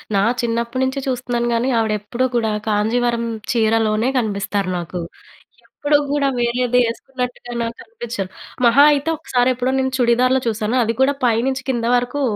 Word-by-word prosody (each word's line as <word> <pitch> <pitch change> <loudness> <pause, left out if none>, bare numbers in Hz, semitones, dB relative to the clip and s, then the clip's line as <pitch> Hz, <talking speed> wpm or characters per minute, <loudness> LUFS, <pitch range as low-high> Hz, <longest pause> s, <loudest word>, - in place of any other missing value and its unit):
నా 195 - +3 0.2
చిన్నప్పటి 235 +2 -1
నుంచి 260 +1 -1
చూస్తున్నాను. 245 -2 -1
కానీ, 235 +3 +1
ఆవిడ 220 -1 +1
ఎప్పుడూ 235 +5 -2
కూడా 225 -2 +1 0.2
కాంజీవరం 235 +3 +1 0.3
చీరలోనే 225 0 +2
కనిపిస్తారు 200 -4 -1
నాకు. 175 +1 -5 0.7
ఎప్పుడు 290 0 +1
కూడా 285 -1 +1
వేరేది 245 +1 +1
వేసుకున్నట్టుగా 245 +1 -5
నాకు 230 0 -3
కనిపించరు. 235 - -6 0.4
మహా 240 +5 +6
అయితే, 290 +2 0
ఒకసారి 255 -5 +1
ఎప్పుడో 255 +1 -1
నేను 265 0 -1
చుడిదార్‌లో 250 +2 +3
చూశాను 220 +2 0
అది 230 +1 -1
కూడా 280 +2 +3
పై 235 -2 +3
నుంచి 260 -1 -3
కింద 235 -2 -2
వరకు 245 +4 -2
240 Hz, 150 wpm, -19 LUFS, 225-255 Hz, 0.7 s, మహా